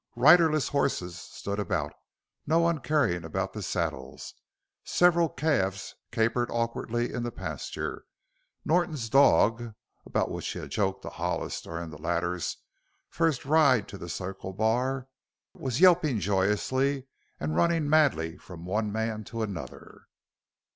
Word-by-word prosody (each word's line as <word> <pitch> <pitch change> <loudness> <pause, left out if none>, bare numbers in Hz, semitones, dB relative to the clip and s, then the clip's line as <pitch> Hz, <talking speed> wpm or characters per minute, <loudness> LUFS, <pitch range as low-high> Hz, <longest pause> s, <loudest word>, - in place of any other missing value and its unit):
Riderless 155 +3 +5
horses 90 -11 0
stood 100 +3 -5
about, 75 -7 -1 0.5
no 160 +2 +3
one 170 -1 +2
caring 125 - +1
about 80 - -3
the - - -5
saddles, - - -4 0.5
several 170 -2 +3
calves 125 -10 -1 0.2
capered 115 +1 +1
awkwardly 120 0 -2
in 120 - -2
the 120 0 -3
pasture. - - -5 0.6
Norton's 155 -8 0
dog 115 -2 +4 0.3
about - - -1
which - - -4
he - - -4
had - - -7
joked 95 -2 -1
to - - -5
Hollis - - -3
during 85 0 -6
the 75 -1 -11
latter's 85 0 -1 0.5
first 160 -6 0
ride 140 -7 +4
to 100 - -9
the 85 - -7
Circle 95 +1 -5
Bar 125 +6 0 0.5
was 130 -2 -3
yelping 170 - +5
joyously 105 - +1 0.3
and 75 +1 -2
running 165 - +2
madly 135 - +2
from 85 -2 -11
one 105 +3 -1
man 110 0 -2
to 115 -1 -4
another. 100 -6 -8
115 Hz, 135 wpm, -28 LUFS, 95-145 Hz, 0.6 s, Riderless